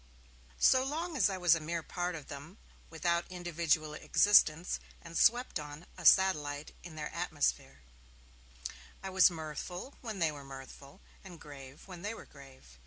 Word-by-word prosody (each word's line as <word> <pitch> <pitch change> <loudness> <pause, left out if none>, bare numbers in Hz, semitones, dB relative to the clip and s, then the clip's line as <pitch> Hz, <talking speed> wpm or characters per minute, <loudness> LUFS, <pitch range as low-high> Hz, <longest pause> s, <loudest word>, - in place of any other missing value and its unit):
So 260 0 +5
long 320 +5 -3
as 210 -8 +4
I 190 - -3
was 175 -2 +5
a 165 - +2
mere 165 +1 -3
part 175 0 -3
of 155 -4 -9
them, 145 +6 -9 0.3
without 170 +1 -1
individual 170 -3 0
existence, 170 -1 +4 0.2
and 170 -1 -11
swept 240 0 +3
on, 150 +2 -9
a 185 - -10
satellite, 150 -6 +3
in 170 -3 -10
their 150 -1 -5
atmosphere, 170 -4 -1 1.2
I 190 - -4
was 190 +1 +6
mirthful 170 - -6
when 220 -4 -5
they 165 -4 +2
were 145 -2 -9
mirthful, 135 +4 -11 0.2
and 180 -4 -11
grave 140 -2 -11
when 180 -2 -9
they 210 +4 -4
were - - -11
grave. 130 - -16
170 Hz, 160 wpm, -32 LUFS, 150-185 Hz, 1.2 s, was